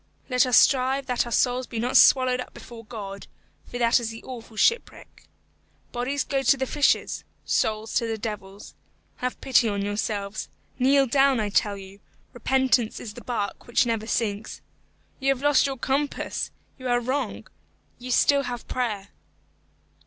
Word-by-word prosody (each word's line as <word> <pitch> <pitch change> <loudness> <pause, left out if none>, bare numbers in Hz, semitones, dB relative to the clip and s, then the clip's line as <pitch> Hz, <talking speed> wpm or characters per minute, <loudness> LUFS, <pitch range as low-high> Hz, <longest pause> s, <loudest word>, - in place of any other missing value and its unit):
Let 250 0 +4
us 250 - +5
strive 265 +1 +3
that 250 -2 0
our - - -7
souls 250 +2 +1
be 235 - -6
not 245 +3 -1
swallowed 255 -1 +6
up - - -10
before 230 -1 -11
God, 200 -3 -8 0.4
for 245 - -6
that 235 0 +4
is 235 -2 -3
the 225 0 -9
awful 235 -3 -10
shipwreck. 465 - 0 0.7
Bodies 260 +3 -1
go 275 -1 -1
to 270 +1 +4
the 265 - -1
fishes, 290 +2 +1 0.2
souls 220 0 0
to 235 - +1
the 225 -1 -2
devils. 205 -2 -7 0.4
Have 250 0 -3
pity 250 -3 +3
on 200 -1 -2
yourselves. 205 0 -3 0.3
Kneel 275 +2 +4
down, 270 0 +3
I 210 -1 -1
tell 205 0 +1
you. 195 0 -12 0.3
Repentance 255 -2 +1
is 215 - -8
the - - -10
bark 210 -5 -4
which 240 +2 +2
never 225 -2 -2
sinks. 215 -3 -2 0.6
You 270 0 0
have 260 - -11
lost 290 -1 +4
your 270 -1 -4
compass! 280 +3 -2 0.3
You 255 - -5
are 245 0 +2
wrong! 260 +4 -3 0.5
You 250 +1 -8
still 280 +3 +4
have 245 -1 -6
prayer." 210 -6 -3
245 Hz, 165 wpm, -25 LUFS, 220-260 Hz, 0.7 s, swallowed